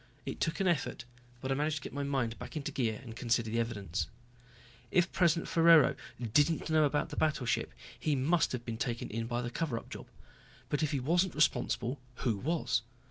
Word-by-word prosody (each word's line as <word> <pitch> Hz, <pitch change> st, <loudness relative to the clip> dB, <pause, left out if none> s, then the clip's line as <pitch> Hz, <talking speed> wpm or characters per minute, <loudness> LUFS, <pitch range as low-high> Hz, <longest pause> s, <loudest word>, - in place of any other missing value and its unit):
It -, -, -5 dB
took 165 Hz, -, -1 dB
an 195 Hz, -, +2 dB
effort, 150 Hz, -7 st, 0 dB, 0.4 s
but 130 Hz, -, -2 dB
I -, -, +4 dB
managed 150 Hz, +3 st, 0 dB
to 150 Hz, -, -4 dB
get -, -, -7 dB
my 140 Hz, -, -2 dB
mind 135 Hz, -5 st, -1 dB
back -, -, -6 dB
into 145 Hz, -, -3 dB
gear 115 Hz, -5 st, -1 dB
and 115 Hz, -3 st, -9 dB
consider 115 Hz, -1 st, 0 dB
the 115 Hz, -, +1 dB
evidence. 105 Hz, -6 st, -2 dB, 0.8 s
If 180 Hz, 0 st, +2 dB
President 170 Hz, -2 st, +2 dB
Ferraro 165 Hz, -4 st, +6 dB, 0.4 s
didn't 155 Hz, +3 st, +3 dB
know 155 Hz, -1 st, +5 dB
about 145 Hz, +2 st, 0 dB
the 150 Hz, -, -6 dB
battleship, 135 Hz, -7 st, +1 dB, 0.3 s
he 150 Hz, -2 st, +1 dB
must 150 Hz, +5 st, +2 dB
have 125 Hz, -2 st, -4 dB
been 115 Hz, -1 st, -4 dB
taken 120 Hz, -1 st, -3 dB
in 115 Hz, +1 st, -2 dB
by 120 Hz, 0 st, -2 dB
the 120 Hz, -, -4 dB
cover 145 Hz, -4 st, -1 dB
up -, -, -9 dB
job. -, -, -8 dB, 0.6 s
But 145 Hz, -, 0 dB
if 155 Hz, -, +1 dB
he 140 Hz, -, 0 dB
wasn't 170 Hz, +7 st, +1 dB
responsible 140 Hz, -3 st, +1 dB, 0.2 s
who 115 Hz, -5 st, 0 dB
was? 160 Hz, -, 0 dB
140 Hz, 200 wpm, -32 LUFS, 120-155 Hz, 0.8 s, Ferraro